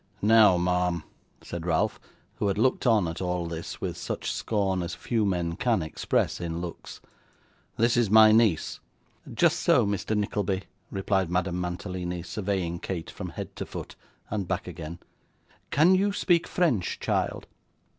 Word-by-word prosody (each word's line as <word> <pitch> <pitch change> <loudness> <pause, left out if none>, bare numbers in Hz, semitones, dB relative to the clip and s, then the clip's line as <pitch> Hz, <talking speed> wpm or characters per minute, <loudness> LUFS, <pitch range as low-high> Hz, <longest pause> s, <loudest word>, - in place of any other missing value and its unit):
'Now, 105 -3 +6
ma'am,' 90 -1 0 0.4
said 85 0 -6
Ralph, 80 -2 +1 0.4
who 105 - 0
had 100 - 0
looked 130 +3 +2
on, 110 -7 +4
at 80 +2 -5
all 90 -1 -1
this, 85 0 -6
with - - -3
such - - -4
scorn 95 -4 0
as 85 0 -4
few 110 -4 0
men 85 -3 -1
can 115 -6 +1
express 80 - -1
in 85 -1 -3
looks, 85 -1 -8 0.8
'this 115 +1 +3
is 120 -4 +3
my 110 +1 +8
niece.' 110 -7 +2 0.5
'Just - - +3
so, - - +4
Mr. 100 +2 -1
Nickleby,' 100 -2 -1 0.3
replied 95 -2 0
Madame 90 0 0
Mantalini, 90 0 -4
surveying 95 -4 -2
Kate 85 -3 -5
from - - -6
head - - -7
to - - -3
foot, - - -8 0.4
and 100 -3 -2
back 95 0 -2
again. 85 -1 -7 0.7
'Can 160 +6 +5
you 195 +2 +3
speak 175 -4 +2
French, 135 - 0
child? - - -1
95 Hz, 155 wpm, -27 LUFS, 85-110 Hz, 0.8 s, my